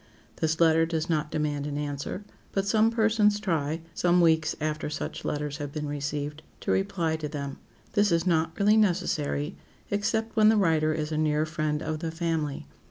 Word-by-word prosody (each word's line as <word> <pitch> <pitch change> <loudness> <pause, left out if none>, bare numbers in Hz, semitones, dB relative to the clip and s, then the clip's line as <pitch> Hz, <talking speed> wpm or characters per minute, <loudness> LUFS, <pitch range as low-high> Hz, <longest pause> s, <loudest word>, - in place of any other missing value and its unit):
This 160 0 0
letter 165 -1 +5
does 160 0 -1
not 150 -2 0
demand 150 -2 -1
an 145 -1 -3
answer, 145 +6 -4 0.3
but 195 0 0
some 220 +2 +4
persons 220 -2 +3
try, 165 -5 -1
some 175 +1 +3
weeks 160 -2 +3
after 155 0 -2
such 150 - -5
letters 145 -1 -2
have 145 -2 -5
been 150 0 -4
received, 145 +1 -3 0.2
to - - -1
reply 185 -5 0
to 155 -1 -4
them. 140 -1 -5 0.4
This 205 -1 +3
is 165 0 +2
not 165 -2 +1
really 210 +2 +5
necessary, 170 -7 0 0.3
except 220 +2 0
when 215 -1 +6
the 220 - +4
writer 160 -5 +3
is 155 0 -2
a 155 - 0
near 155 0 +2
friend 155 -1 -2
of 155 -1 -3
the 165 0 -3
family. 160 -3 -2
160 Hz, 180 wpm, -27 LUFS, 150-185 Hz, 0.4 s, when